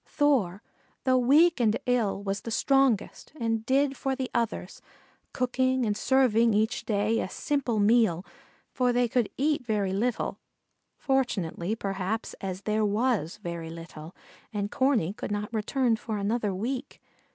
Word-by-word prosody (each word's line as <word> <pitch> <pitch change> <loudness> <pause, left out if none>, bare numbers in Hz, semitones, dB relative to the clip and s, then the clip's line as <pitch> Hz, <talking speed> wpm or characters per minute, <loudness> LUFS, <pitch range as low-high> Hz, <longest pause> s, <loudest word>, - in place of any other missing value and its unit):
Thor, 235 - +1 0.4
though 255 -1 +3
weak 300 +6 +5
and 225 -2 +3
ill, 230 -6 0
was 200 +1 -2
the - - -6
strongest 270 -1 +1
and 225 -1 -1
did 275 +1 +2
for 270 0 -2
the 260 -1 -4
others, 230 -5 -2 0.5
cooking 255 0 +1
and 210 -1 0
serving 235 -3 +3
each 220 +2 0
day 215 +1 +1
a - - -3
simple 270 -4 -1
meal, 205 -4 +3 0.5
for 250 -1 +1
they 245 0 +2
could 235 -1 0
eat 290 0 +1
very 210 -5 -1
little, 230 +4 -1 0.6
fortunately, 215 - -1
perhaps, 195 +1 -3
as 190 -1 -4
there 215 0 0
was 210 -4 0
very 170 -2 -5
little, 165 0 -10 0.4
and 205 -2 -3
Corney 255 - +1
could - - -6
not 210 +2 -3
return 230 +2 +1
for 220 -1 -4
another 210 +1 0
week. 250 +8 -4
225 Hz, 145 wpm, -27 LUFS, 200-255 Hz, 0.6 s, weak